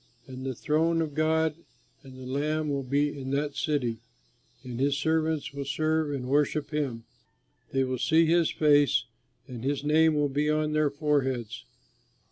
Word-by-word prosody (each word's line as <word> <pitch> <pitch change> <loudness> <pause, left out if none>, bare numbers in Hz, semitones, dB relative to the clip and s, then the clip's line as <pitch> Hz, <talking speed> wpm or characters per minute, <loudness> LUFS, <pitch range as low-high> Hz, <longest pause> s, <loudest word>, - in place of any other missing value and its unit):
And 130 0 -9
the 130 -1 -3
throne 160 +5 +1
of 155 -3 -2
God 160 0 +1 0.4
and 130 -2 -13
the 130 - -9
Lamb 150 +4 -1
will 140 -1 -1
be 140 +3 0
in 135 -2 -6
that 145 0 -2
city; 125 -7 -1 0.6
and 125 -1 -6
his 140 +1 +1
servants 160 -1 0
will 140 0 -4
serve 155 +2 0
and 130 -3 -4
worship 145 +2 +1
him; 135 -7 -2 0.7
they 135 0 +1
will 130 -1 -2
see 160 +5 +4
his 165 0 +3
face 145 -3 +3 0.4
and 125 -2 -8
his 140 +1 -1
name 155 +1 +4
will 145 -1 +2
be 145 +2 0
on 155 0 +1
their 155 -1 +2
foreheads. 135 -6 -1
145 Hz, 165 wpm, -27 LUFS, 135-155 Hz, 0.7 s, see